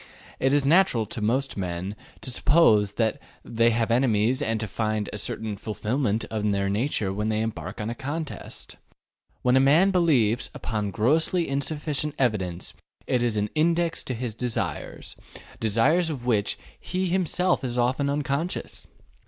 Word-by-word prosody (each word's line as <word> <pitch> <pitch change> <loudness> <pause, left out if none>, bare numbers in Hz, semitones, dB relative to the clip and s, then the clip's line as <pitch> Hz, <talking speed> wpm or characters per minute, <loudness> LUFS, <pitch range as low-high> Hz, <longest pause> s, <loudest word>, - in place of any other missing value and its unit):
It 135 - +2
is 145 -1 +3
natural 155 - +4
to 110 - -6
most 130 +5 0
men 90 +1 -3 0.3
to 130 - 0
suppose 110 -9 +4
that 110 0 0 0.2
they 115 0 +3
have 115 0 0
enemies 120 +1 +2
and 115 -5 0
to 110 - -2
find 110 0 -2
a 105 - -3
certain 110 +1 -3
fulfillment 110 +2 -1
of 105 -1 0
their 100 0 0
nature 105 -3 0
when 105 +2 -1
they 110 0 0
embark 110 0 -4
upon 110 +2 -2
a - - -2
contest. 145 +4 -6 0.7
What 125 0 +4
a - - +6
man 155 +9 +5
believes 135 - +2
upon 105 -2 -2
grossly 155 - +1
insufficient 145 +1 -2
evidence 95 -9 -1 0.3
is 120 -3 +1
an 105 0 -1
index 165 +1 +1
to 125 - -3
his 120 -1 -4
desires 120 +1 -3 0.4
desires 135 - +3
of 135 -6 -5
which 110 -5 +1 0.2
he 185 +1 -2
himself 180 -1 +1
is 125 -1 -2
often 130 +4 +1
unconscious. 145 +4 -2
120 Hz, 155 wpm, -25 LUFS, 110-145 Hz, 0.7 s, a